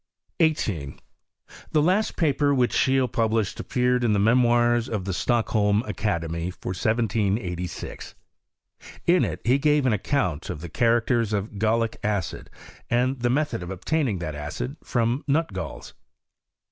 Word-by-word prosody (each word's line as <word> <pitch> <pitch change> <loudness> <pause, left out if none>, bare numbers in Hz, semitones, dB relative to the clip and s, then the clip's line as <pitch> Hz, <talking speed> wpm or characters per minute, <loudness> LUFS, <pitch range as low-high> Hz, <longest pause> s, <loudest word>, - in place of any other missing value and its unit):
18. 105 - 0 0.7
TTie 150 - +4
last 195 +5 +1
paper 145 -3 +2
which 125 -2 +2
Scheele 130 -1 +3
published 110 -3 0
ap - - -7
peared 125 0 +2
in 115 -3 +3
the - - +2
Memoirs 120 +2 +3
of 105 -4 -3
the 95 - -2
Stockholm 105 -1 +1
Academy, 85 -7 -2
lor 90 - -1
17SG: 100 -4 -2 0.9
in 175 +1 +4
it - - -3
he 130 +4 +3
gave 150 -1 +3
an 125 - +3
account 95 - -1
of 85 -4 -5
the 85 - -7
characters 115 +2 +1
of 100 0 -3
gallic 110 +1 +1
acid, 100 -5 -2 0.4
and 125 +2 +1
the 120 0 +1
method 150 -3 0
of 90 - -6
obtaining 115 - -1
that 85 -3 -4
acid 75 - -5
from 120 +3 0
nu 150 +4 +3
trails. 165 - -7
115 Hz, 145 wpm, -25 LUFS, 100-130 Hz, 0.9 s, TTie